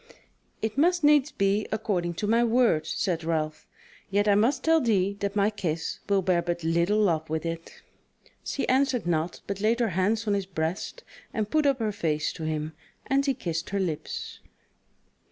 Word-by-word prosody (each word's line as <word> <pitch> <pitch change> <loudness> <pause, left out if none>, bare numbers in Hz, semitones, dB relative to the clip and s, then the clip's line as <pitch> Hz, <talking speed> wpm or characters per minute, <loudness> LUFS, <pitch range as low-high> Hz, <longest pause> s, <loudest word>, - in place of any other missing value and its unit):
"It 220 +5 -1
must 350 +2 +3
needs 295 -1 +5
be 200 +2 +1
according 180 -5 -1
to 210 - -2
my 230 +3 +3
word," 230 -9 +3
said 170 -4 -1
Ralph, 155 -2 -2 0.4
"yet 205 +1 +1
I 205 - +5
must 225 +7 +2
tell 325 0 +4
thee 200 -5 +1
that 200 0 -2
my 205 +1 +3
kiss 170 -6 -3
will 195 -1 +3
bear 175 -1 +2
but 175 0 -3
little 170 +5 +2
love 165 -7 +1
with 160 +1 -2
it." 165 0 -6 0.6
She 280 - -2
answered 260 -3 +2
naught 170 0 -1
but 200 0 -4
laid 225 +3 +2
her 235 -2 +2
hands 200 +5 0
on 205 - +2
his 200 -2 -1
breast 175 - -3 0.3
and 215 -2 -1
put 305 -2 +3
up 275 -2 +3
her 220 -3 -1
face 155 -7 -1
to 160 - -6
him, 155 0 -2 0.3
and 275 +1 +2
he 275 -2 +1
kissed 170 -8 -3
her 200 - -1
lips. 170 -6 -4
200 Hz, 185 wpm, -27 LUFS, 170-230 Hz, 0.6 s, needs